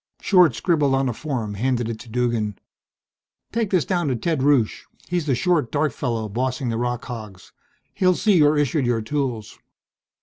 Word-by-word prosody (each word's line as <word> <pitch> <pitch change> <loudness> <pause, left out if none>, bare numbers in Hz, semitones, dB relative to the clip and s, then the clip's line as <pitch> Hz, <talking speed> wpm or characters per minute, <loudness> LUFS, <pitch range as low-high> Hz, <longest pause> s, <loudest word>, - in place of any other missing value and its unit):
Short 180 - +4
scribbled 150 -6 +2
on 135 0 +1
a - - -2
form, 120 -6 -4
handed 120 +2 -1
it 115 -1 -5
to 120 - -12
Duggan. 115 -3 -1 0.9
"Take 230 -3 -1
this 185 -5 +2
down 175 -4 0
to 130 - 0
Ted 155 +4 -1
Rusche, 135 -6 +2 0.2
he's 175 -3 -2
the 135 - +2
short, 160 -4 +1
dark 150 0 +1
fellow 115 -4 -2
bossing 125 +3 -2
the 115 - -1
rock 120 0 -2
hogs. 110 -7 -9 0.4
He'll 185 -1 +2
see 205 -1 +3
you're 150 -1 +4
issued 145 -2 +1
your 120 -2 +1
tools." 125 -4 -3
130 Hz, 175 wpm, -22 LUFS, 115-155 Hz, 0.9 s, Short